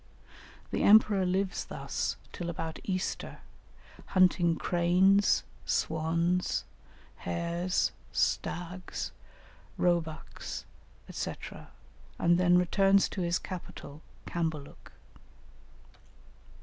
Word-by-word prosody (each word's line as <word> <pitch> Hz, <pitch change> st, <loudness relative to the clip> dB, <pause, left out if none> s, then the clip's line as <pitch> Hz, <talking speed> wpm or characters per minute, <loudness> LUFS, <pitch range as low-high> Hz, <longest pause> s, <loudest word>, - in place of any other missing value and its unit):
The -, -, -1 dB
emperor 205 Hz, -3 st, +6 dB
lives 185 Hz, 0 st, 0 dB
thus -, -, -3 dB
till 175 Hz, -2 st, -5 dB
about 165 Hz, -1 st, -4 dB
Easter, 185 Hz, -1 st, -3 dB, 0.7 s
hunting 180 Hz, -2 st, +4 dB
cranes, 180 Hz, +4 st, +3 dB, 0.2 s
swans, 170 Hz, +3 st, 0 dB, 0.5 s
hares, 170 Hz, -, -1 dB, 0.2 s
stags, 180 Hz, +1 st, -2 dB, 0.7 s
roebucks, 170 Hz, -3 st, -2 dB, 0.5 s
&c., -, -, -3 dB, 0.8 s
and 175 Hz, 0 st, +3 dB
then 180 Hz, -1 st, +5 dB
returns 195 Hz, +2 st, +4 dB
to 190 Hz, -, -4 dB
his 170 Hz, 0 st, +1 dB
capital, 160 Hz, -5 st, -8 dB, 0.2 s
Cambaluc. 160 Hz, -4 st, -4 dB
175 Hz, 75 wpm, -30 LUFS, 170-185 Hz, 0.8 s, emperor